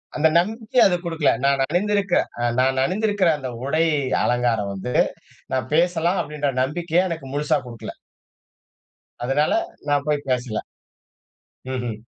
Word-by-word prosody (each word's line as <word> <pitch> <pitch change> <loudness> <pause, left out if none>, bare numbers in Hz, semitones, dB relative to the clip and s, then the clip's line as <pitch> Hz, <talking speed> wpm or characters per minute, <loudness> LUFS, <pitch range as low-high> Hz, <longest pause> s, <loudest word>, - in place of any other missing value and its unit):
அந்த 160 +1 +4
நம்பிக்கை 220 +6 -1
அது 180 -2 +4
குடுக்கல. 165 -3 +1
நான் 140 -1 +3
அணிந்திருக்கற 200 +2 +1 0.2
அ - - 0 0.2
நான் 130 0 +2
அணிந்திருக்கற 205 0 +1
அந்த 130 -3 -5 0.2
உடையை 155 +1 +2 0.2
அலங்காரம் 115 -5 +1
வந்து 125 +6 -5 0.6
நான் 130 -1 -1
பேசலாம் 175 +2 +2
அப்படின்ற 145 -1 -2
நம்பிக்கைய 170 +6 +1
எனக்கு 160 -5 -5
முழுசா 150 +1 +1
குடுக்கல. 115 -2 -8 1.3
அதனால 135 +4 +1 0.4
நான் 145 -1 +2
போய் 145 -2 0
பேசல. 125 -4 -1 1.1
ம்ஹ்ம். 120 -4 -4
150 Hz, 125 wpm, -22 LUFS, 130-175 Hz, 1.3 s, அந்த